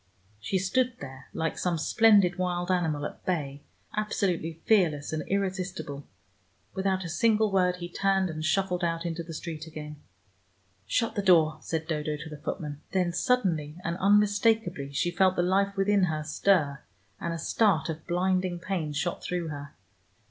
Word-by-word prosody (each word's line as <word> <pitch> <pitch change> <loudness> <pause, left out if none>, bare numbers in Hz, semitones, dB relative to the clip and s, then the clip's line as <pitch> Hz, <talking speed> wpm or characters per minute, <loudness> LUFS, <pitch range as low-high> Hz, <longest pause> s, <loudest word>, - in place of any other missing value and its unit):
She 190 - -1
stood 245 +7 +1
there 130 -1 -9
like 160 0 -2
some 175 -2 0
splendid 200 0 +4
wild 180 0 -1
animal 160 -5 0
at - - -7
bay, 145 -6 -2 0.3
absolutely 190 -6 -1
fearless 160 -9 +2
and 155 - -1
irresistible. 185 -7 -3 0.7
Without 190 -1 0
a - - -3
single 215 +5 +2
word, 180 -2 +3
he 175 -1 -6
turned, 195 +1 +1
and 155 -2 -5
shuffled 180 +1 0
out 165 0 -1
into 170 0 -2
the 165 -1 -8
street 160 -1 -6
again. 150 -1 -8 0.9
"Shut 230 - +1
the 205 - -1
door," 160 -5 +4
said 160 -1 -3
Dodo 150 -1 -2
to 160 +2 -8
the 150 - -8
footman. 150 -2 -5
Then 180 -2 +1
suddenly 175 - 0
and 170 - -2
unmistakably 205 -5 +2
she 175 +5 0
felt 185 +1 +3
the 175 - +1
life 195 +2 +1
within 195 0 +3
her 155 -3 -2
stir, 150 -3 +1 0.4
and 170 - -3
a 165 - -3
start 180 0 +2
of 160 -1 -6
blinding 185 0 +1
pain 170 -4 -3
shot 175 +4 -2
through 175 -2 -2
her. 145 -1 -8
175 Hz, 165 wpm, -28 LUFS, 155-195 Hz, 0.9 s, splendid